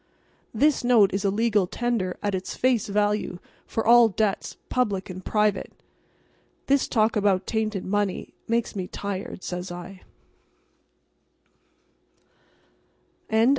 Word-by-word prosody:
"This 285 Hz, +5 st, +2 dB
note 230 Hz, -6 st, +5 dB
is 195 Hz, +1 st, -1 dB
a 200 Hz, -, +2 dB
legal 210 Hz, -2 st, +2 dB
tender 230 Hz, -5 st, -2 dB
at 205 Hz, -1 st, 0 dB
its 190 Hz, 0 st, -4 dB
face 250 Hz, -4 st, +1 dB
value 205 Hz, -2 st, 0 dB, 0.3 s
for 225 Hz, -, -2 dB
all 235 Hz, 0 st, +7 dB
debts 205 Hz, -1 st, -1 dB
public 200 Hz, -7 st, -1 dB
and 185 Hz, +1 st, -8 dB
private." 210 Hz, -2 st, 0 dB, 0.9 s
"This 275 Hz, 0 st, +2 dB
talk 220 Hz, 0 st, +2 dB
about 200 Hz, -2 st, +2 dB
tainted 215 Hz, -3 st, -2 dB
money 205 Hz, -1 st, -1 dB
makes 230 Hz, -1 st, 0 dB
me 185 Hz, -2 st, -3 dB
tired," 195 Hz, -1 st, -5 dB
says 180 Hz, 0 st, -5 dB
I. 180 Hz, +2 st, -9 dB
205 Hz, 115 wpm, -25 LUFS, 190-225 Hz, 0.9 s, all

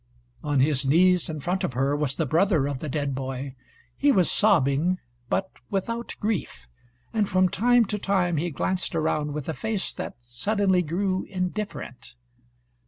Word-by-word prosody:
On 145 Hz, -3 st, +2 dB
his 140 Hz, -1 st, +3 dB
knees 175 Hz, +6 st, +4 dB
in 155 Hz, -2 st, -4 dB
front 180 Hz, +6 st, -1 dB
of -, -, -1 dB
her 135 Hz, +3 st, +1 dB
was 145 Hz, -2 st, -1 dB
the 160 Hz, -, 0 dB
brother 165 Hz, 0 st, +2 dB
of 140 Hz, -2 st, -3 dB
the 155 Hz, -, -5 dB
dead 145 Hz, -1 st, -1 dB
boy; 130 Hz, 0 st, -4 dB, 0.4 s
he 285 Hz, -, +3 dB
was 185 Hz, -8 st, +3 dB
sobbing, 175 Hz, -3 st, +3 dB, 0.3 s
but 190 Hz, 0 st, 0 dB, 0.2 s
without 230 Hz, +4 st, -3 dB
grief, 180 Hz, -, -3 dB, 0.5 s
and 210 Hz, -3 st, +1 dB
from 185 Hz, 0 st, +4 dB
time 240 Hz, +5 st, +3 dB
to 210 Hz, +1 st, -3 dB
time 185 Hz, -4 st, +1 dB
he 170 Hz, +4 st, 0 dB
glanced 180 Hz, +4 st, -1 dB
around 150 Hz, -2 st, 0 dB
with 150 Hz, -3 st, -4 dB
a 160 Hz, -, -1 dB
face 220 Hz, +2 st, -3 dB
that -, -, -6 dB
suddenly 185 Hz, -, +1 dB
grew 185 Hz, +3 st, -1 dB
indifferent. 185 Hz, -, -5 dB
175 Hz, 165 wpm, -25 LUFS, 140-195 Hz, 0.5 s, knees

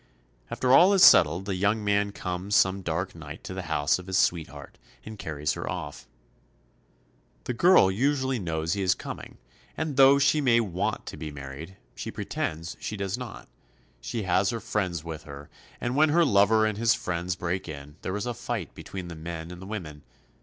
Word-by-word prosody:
After 130 Hz, 0 st, +1 dB
all 180 Hz, +8 st, +7 dB
is 195 Hz, -, +5 dB
settled 85 Hz, +4 st, +7 dB
the 100 Hz, -, -2 dB
young 100 Hz, +4 st, +1 dB
man 100 Hz, 0 st, +1 dB
comes 90 Hz, +1 st, -3 dB
some 95 Hz, 0 st, +3 dB
dark 90 Hz, +2 st, -3 dB
night 80 Hz, -1 st, -10 dB
to -, -, -6 dB
the 95 Hz, -, -4 dB
house 75 Hz, +2 st, +1 dB
of 90 Hz, -, -11 dB
his 95 Hz, 0 st, 0 dB
sweetheart 85 Hz, -4 st, -1 dB, 0.3 s
and 110 Hz, -2 st, -9 dB
carries 75 Hz, -3 st, -2 dB
her -, -, -5 dB
off. -, -, -6 dB, 1.4 s
The 125 Hz, -, -3 dB
girl 170 Hz, -, +5 dB
usually 130 Hz, +3 st, 0 dB
knows 80 Hz, -3 st, -2 dB
he 100 Hz, -, -2 dB
is 95 Hz, -1 st, +2 dB
coming, -, -, -8 dB, 0.4 s
and 155 Hz, -4 st, -3 dB
though 135 Hz, +1 st, +7 dB
she 140 Hz, +2 st, +3 dB
may 120 Hz, -4 st, +4 dB
want 95 Hz, -6 st, -2 dB
to -, -, -8 dB
be 75 Hz, -, -6 dB
married, 70 Hz, +6 st, -9 dB, 0.2 s
she -, -, -6 dB
pretends 80 Hz, +2 st, -4 dB
she 105 Hz, -, -5 dB
does 95 Hz, -1 st, -2 dB
not. 125 Hz, -3 st, -8 dB, 0.5 s
She 110 Hz, -, -4 dB
has 95 Hz, +1 st, +2 dB
her 115 Hz, -, -2 dB
friends 90 Hz, -8 st, -2 dB
with 80 Hz, -2 st, -6 dB
her, 70 Hz, 0 st, -10 dB, 0.3 s
and 120 Hz, +1 st, -2 dB
when 155 Hz, +2 st, +4 dB
her 170 Hz, +3 st, +4 dB
lover 110 Hz, -2 st, +4 dB
and 110 Hz, -1 st, -2 dB
his 115 Hz, 0 st, +3 dB
friends 90 Hz, 0 st, -3 dB
break 90 Hz, 0 st, -3 dB
in, 75 Hz, -1 st, -9 dB
there 95 Hz, -, -3 dB
is 105 Hz, -, -4 dB
a 120 Hz, -, -2 dB
fight -, -, -5 dB
between 95 Hz, -2 st, -8 dB
the 85 Hz, -, -7 dB
men 80 Hz, +1 st, -7 dB
and 90 Hz, 0 st, -10 dB
the 95 Hz, -, -9 dB
women. 85 Hz, -9 st, -6 dB
95 Hz, 195 wpm, -27 LUFS, 85-115 Hz, 1.4 s, all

